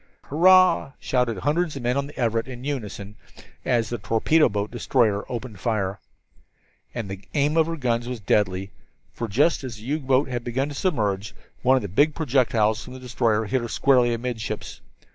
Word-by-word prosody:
"Hurrah!" 180 Hz, -, +4 dB
shouted 125 Hz, -4 st, 0 dB
hundreds 150 Hz, -, 0 dB
of 135 Hz, -, -6 dB
men 120 Hz, +1 st, +1 dB
on 140 Hz, 0 st, -1 dB
the 145 Hz, -, -13 dB
Everett 115 Hz, -1 st, 0 dB
in 125 Hz, -1 st, -8 dB
unison 105 Hz, -7 st, -5 dB, 0.5 s
as 115 Hz, -2 st, +1 dB
the 120 Hz, -, -3 dB
torpedo 115 Hz, +10 st, +3 dB
boat 100 Hz, +1 st, -3 dB
destroyer 115 Hz, -3 st, +1 dB
opened 120 Hz, -4 st, -6 dB
fire. 100 Hz, -2 st, -1 dB, 1.0 s
And 115 Hz, -4 st, -3 dB
the 95 Hz, 0 st, -6 dB, 0.2 s
aim 145 Hz, +1 st, +2 dB
of 160 Hz, -1 st, +4 dB
her 165 Hz, -, -2 dB
gunners 120 Hz, -5 st, -1 dB
was 125 Hz, -2 st, -4 dB
deadly! 95 Hz, -1 st, 0 dB, 0.4 s
for 115 Hz, -, -4 dB
just 140 Hz, +10 st, +2 dB
as 125 Hz, -3 st, -5 dB
the 105 Hz, -, -12 dB
U 145 Hz, +6 st, -1 dB
boat 135 Hz, 0 st, +2 dB, 0.2 s
began 130 Hz, +4 st, -1 dB
to -, -, -6 dB
submerge, 110 Hz, -, -1 dB, 0.3 s
one 130 Hz, +1 st, +4 dB
of 130 Hz, -, 0 dB
the -, -, -3 dB
big 145 Hz, -, +2 dB
projectiles 120 Hz, -7 st, +1 dB
from 125 Hz, -, -10 dB
the -, -, -8 dB
destroyer 115 Hz, -3 st, 0 dB
hit 130 Hz, +4 st, 0 dB
her 120 Hz, -, -4 dB
squarely 125 Hz, 0 st, +3 dB
amidships. 115 Hz, -2 st, -4 dB
120 Hz, 180 wpm, -24 LUFS, 110-140 Hz, 1.0 s, Hurrah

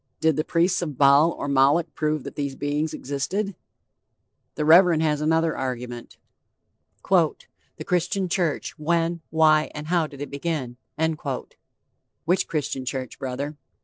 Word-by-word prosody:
Did 160 Hz, -2 st, +2 dB
the 155 Hz, -, 0 dB
priests 175 Hz, +3 st, +1 dB
of 150 Hz, -6 st, -4 dB
Baal 140 Hz, +3 st, +6 dB
or -, -, -5 dB
Moloch 140 Hz, +4 st, +3 dB
prove 155 Hz, -2 st, -1 dB
that -, -, -7 dB
these 140 Hz, -2 st, -3 dB
beings 145 Hz, +2 st, -1 dB
existed? 185 Hz, +9 st, -3 dB, 1.0 s
The 150 Hz, -, -1 dB
Reverend 165 Hz, 0 st, +6 dB
has 150 Hz, -2 st, +1 dB
another 160 Hz, +1 st, +2 dB
argument: 125 Hz, -2 st, -5 dB, 0.9 s
"The -, -, +2 dB, 0.4 s
Christian 180 Hz, +2 st, 0 dB
Church 170 Hz, -3 st, -2 dB
when, 170 Hz, +2 st, 0 dB
why 155 Hz, -1 st, +4 dB
and 150 Hz, 0 st, -6 dB
how 170 Hz, -3 st, +2 dB
did 140 Hz, -2 st, -13 dB
it 145 Hz, -, -6 dB
begin?" 140 Hz, -4 st, -3 dB, 1.5 s
Which 180 Hz, +3 st, +1 dB
Christian 145 Hz, -4 st, -2 dB
church, 130 Hz, -1 st, -5 dB
brother? 140 Hz, +3 st, -4 dB
155 Hz, 135 wpm, -24 LUFS, 140-170 Hz, 1.5 s, Baal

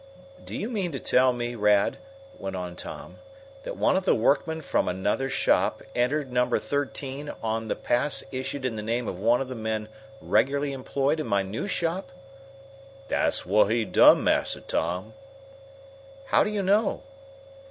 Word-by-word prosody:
"Do -, -, -6 dB
you 215 Hz, -, -3 dB
mean 200 Hz, -8 st, -2 dB
to 135 Hz, -, -3 dB
tell 130 Hz, 0 st, +4 dB
me, 120 Hz, 0 st, -3 dB
Rad," 105 Hz, -3 st, +2 dB, 0.4 s
went 95 Hz, -1 st, -5 dB
on 90 Hz, -1 st, -5 dB
Tom, -, -, -9 dB, 0.4 s
"that -, -, -6 dB
one -, -, +3 dB
of 190 Hz, -, +1 dB
the 185 Hz, -, +3 dB
workmen 160 Hz, +7 st, +1 dB
from 145 Hz, -, 0 dB
another 95 Hz, +9 st, -1 dB
shop 135 Hz, -, +1 dB
entered 130 Hz, +3 st, 0 dB
Number 125 Hz, 0 st, +2 dB
Thirteen 140 Hz, 0 st, -3 dB
on 110 Hz, 0 st, -2 dB
the -, -, -1 dB
pass 130 Hz, +5 st, 0 dB
issued 130 Hz, +1 st, -4 dB
in 115 Hz, -4 st, -2 dB
the -, -, -3 dB
name 115 Hz, +2 st, -2 dB
of 90 Hz, -, -4 dB
one 115 Hz, +5 st, +3 dB
of 135 Hz, -, -3 dB
the 130 Hz, -, -5 dB
men 110 Hz, -2 st, -3 dB, 0.3 s
regularly 140 Hz, +1 st, +1 dB
employed 140 Hz, +3 st, -1 dB
in 155 Hz, -, -3 dB
my 100 Hz, -1 st, +2 dB
new 105 Hz, -, -4 dB
shop?" 170 Hz, -4 st, -2 dB, 1.0 s
"Dat's -, -, +1 dB
whut 105 Hz, +2 st, +3 dB
he 115 Hz, 0 st, +1 dB
done, 95 Hz, -, +6 dB
Massa -, -, +1 dB
Tom." 90 Hz, +6 st, -2 dB, 1.2 s
"How -, -, +5 dB
do -, -, -1 dB
you 210 Hz, -2 st, -2 dB
know?" 205 Hz, +4 st, +2 dB
125 Hz, 165 wpm, -26 LUFS, 110-145 Hz, 1.2 s, done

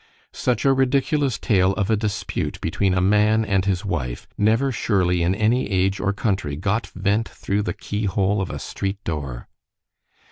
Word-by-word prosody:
Such 125 Hz, +1 st, -1 dB
a 135 Hz, -, +5 dB
ridiculous 135 Hz, -1 st, +1 dB
tale 95 Hz, -5 st, +2 dB
of 100 Hz, +1 st, -1 dB
a -, -, +5 dB
dispute 105 Hz, -2 st, -3 dB
between 95 Hz, +3 st, 0 dB
a 90 Hz, -, +2 dB
man 105 Hz, +2 st, +3 dB
and 95 Hz, -2 st, +1 dB
his 95 Hz, -1 st, 0 dB
wife, 65 Hz, -11 st, -3 dB
never 115 Hz, +6 st, +2 dB
surely 90 Hz, -6 st, +1 dB
in 90 Hz, +3 st, +2 dB
any 110 Hz, +3 st, +1 dB
age 95 Hz, 0 st, +1 dB
or 100 Hz, +1 st, +1 dB
country 100 Hz, -8 st, -1 dB
got 100 Hz, +6 st, -1 dB
vent 100 Hz, +4 st, 0 dB
through 100 Hz, +1 st, -2 dB
the 105 Hz, -, -2 dB
key 105 Hz, +1 st, -3 dB
hole 100 Hz, +1 st, +1 dB
of 95 Hz, -, -3 dB
a -, -, -4 dB
street 95 Hz, 0 st, -4 dB
door. 70 Hz, -7 st, -4 dB
100 Hz, 175 wpm, -22 LUFS, 95-110 Hz, -, a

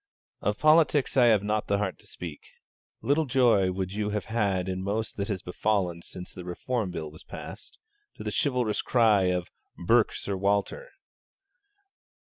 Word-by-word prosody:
Of -, -, 0 dB
politics 155 Hz, -3 st, +4 dB
I 125 Hz, -2 st, +6 dB
have 110 Hz, -4 st, +4 dB
not 105 Hz, +1 st, -1 dB
the 100 Hz, -, +2 dB
heart 100 Hz, -2 st, -2 dB
to -, -, -16 dB
speak. 80 Hz, -4 st, -8 dB, 0.6 s
Little 145 Hz, +2 st, +2 dB
joy 120 Hz, -8 st, +4 dB
would 95 Hz, 0 st, -3 dB
you 105 Hz, 0 st, -1 dB
have 105 Hz, -1 st, -2 dB
had 100 Hz, -5 st, 0 dB
in 95 Hz, 0 st, -3 dB
most 105 Hz, +3 st, -2 dB
that 100 Hz, -1 st, -2 dB
has 100 Hz, -4 st, -3 dB
befallen 90 Hz, -2 st, -1 dB
since 90 Hz, +1 st, -9 dB
the 90 Hz, -, -8 dB
Reform 105 Hz, +4 st, -2 dB
Bill 80 Hz, -4 st, -5 dB
was 80 Hz, -, -14 dB
passed, -, -, -9 dB, 0.4 s
to -, -, -8 dB
the -, -, -3 dB
chivalrous 125 Hz, -7 st, +1 dB
cry 110 Hz, -6 st, +3 dB
of 90 Hz, -1 st, -1 dB, 0.3 s
'burke 115 Hz, +6 st, +3 dB
Sir 100 Hz, -, -3 dB
Walter.' 100 Hz, -, 0 dB
100 Hz, 165 wpm, -27 LUFS, 95-115 Hz, 0.6 s, I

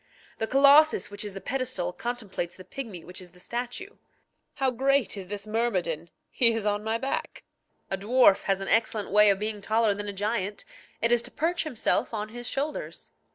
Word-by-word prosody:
The 225 Hz, -, 0 dB
colossus 280 Hz, +1 st, +5 dB
which 205 Hz, -, -3 dB
is 205 Hz, -2 st, -6 dB
the -, -, -4 dB
pedestal 250 Hz, -8 st, -2 dB
contemplates 215 Hz, -8 st, -4 dB
the 185 Hz, -, -12 dB
pigmy 225 Hz, -11 st, -7 dB
which 180 Hz, +1 st, -7 dB
is 180 Hz, -1 st, -13 dB
the 180 Hz, -, -16 dB
statue. 245 Hz, -, -5 dB, 0.6 s
How 265 Hz, -1 st, +1 dB
great 270 Hz, 0 st, +1 dB
is 195 Hz, -2 st, -7 dB
this 200 Hz, +1 st, -4 dB
myrmidon! 185 Hz, -8 st, -1 dB, 0.2 s
he 230 Hz, -2 st, +4 dB
is 225 Hz, -2 st, -2 dB
on 205 Hz, 0 st, 0 dB
my 220 Hz, +1 st, 0 dB
back. 270 Hz, +3 st, -4 dB, 0.5 s
A 195 Hz, -, -1 dB
dwarf 215 Hz, -1 st, +5 dB
has 195 Hz, -1 st, +1 dB
an 195 Hz, -, -4 dB
excellent 220 Hz, -2 st, +1 dB
way 210 Hz, +1 st, +7 dB
of 200 Hz, -, +4 dB
being 210 Hz, 0 st, -3 dB
taller 220 Hz, +1 st, +2 dB
than 205 Hz, +1 st, -6 dB
a -, -, -1 dB
giant: 205 Hz, 0 st, -2 dB, 0.4 s
it 230 Hz, -, +3 dB
is 240 Hz, -1 st, +4 dB
to -, -, -11 dB
perch 340 Hz, +2 st, -1 dB
himself 240 Hz, -4 st, 0 dB
on 210 Hz, 0 st, -3 dB
his 240 Hz, +2 st, -8 dB
shoulders. 290 Hz, +3 st, -4 dB
220 Hz, 195 wpm, -27 LUFS, 200-245 Hz, 0.6 s, way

